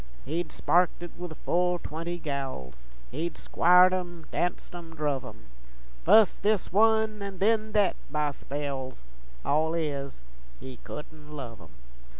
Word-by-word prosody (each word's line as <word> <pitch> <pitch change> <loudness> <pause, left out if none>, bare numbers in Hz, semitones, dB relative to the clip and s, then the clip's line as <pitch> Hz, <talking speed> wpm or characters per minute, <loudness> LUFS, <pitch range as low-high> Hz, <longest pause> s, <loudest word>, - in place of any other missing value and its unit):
He'd 160 +4 -2
sparked 175 0 +2
it 175 - -7
with 175 -3 -7
full 180 0 +2
twenty 170 +1 -5
gals, 130 - -5 0.2
Hed 160 +4 -3
squired 180 +2 +5
'em, 175 -3 -4
danced 175 0 -2
'em, 165 -2 -9
druv 145 -4 -1
'em, - - -11 0.6
Fust 220 -3 +6
this 205 -3 +1
one, 220 0 +3
an' 200 -1 -5
then 215 +2 +2
thet, 205 -3 +3
by 150 0 0
spells 135 - -5 0.4
All 160 +3 +2
is, 140 - -3 0.4
he 130 -1 -9
couldn't 150 +2 -10
love 115 -8 -7
'em. 80 -1 -16
165 Hz, 140 wpm, -28 LUFS, 140-180 Hz, 0.6 s, Fust